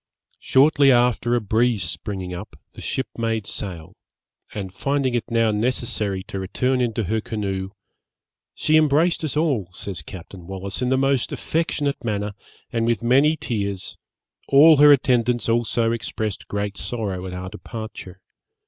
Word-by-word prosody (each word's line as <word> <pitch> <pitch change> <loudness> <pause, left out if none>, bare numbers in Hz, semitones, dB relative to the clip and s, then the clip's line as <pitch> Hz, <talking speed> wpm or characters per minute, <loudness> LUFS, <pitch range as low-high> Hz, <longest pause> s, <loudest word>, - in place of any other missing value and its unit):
Shortly 140 0 +4
after 120 -1 +3
a - - +2
breeze 115 0 +1
springing 90 +1 -4
up, 90 +5 -8 0.2
the - - -11
ship 130 - -2
made 115 -2 -1
sail; 85 -7 -6 0.6
and 95 -3 -6
finding 135 +3 0
it 120 - -2
now 115 -1 +2
necessary 105 -3 -1
to 95 - -6
return 125 +7 0
into 115 -2 0
her 110 +4 -1
canoe, 95 -4 -3 0.9
'she 155 0 +3
embraced 155 +3 +3
us 150 -2 -2
all,' 135 - +1
says 90 -2 -6
Captain 90 +1 -11
Wallis, 95 +2 -5
'in 125 - +1
the 130 - +3
most 135 -2 +1
affectionate 150 -4 -1
manner, 105 -2 -2 0.4
and 115 -1 +1
with 115 0 0
many 140 +6 +4
tears; 100 -7 -3 0.5
all 150 +3 +7
her 145 +1 +8
attendants 125 -3 +3
also 115 0 +1
expressed 110 -2 -4
great 100 0 -3
sorrow 100 -6 -3
at 90 - -7
our 90 0 -5
departure. 105 -3 -8
115 Hz, 150 wpm, -23 LUFS, 100-130 Hz, 0.9 s, her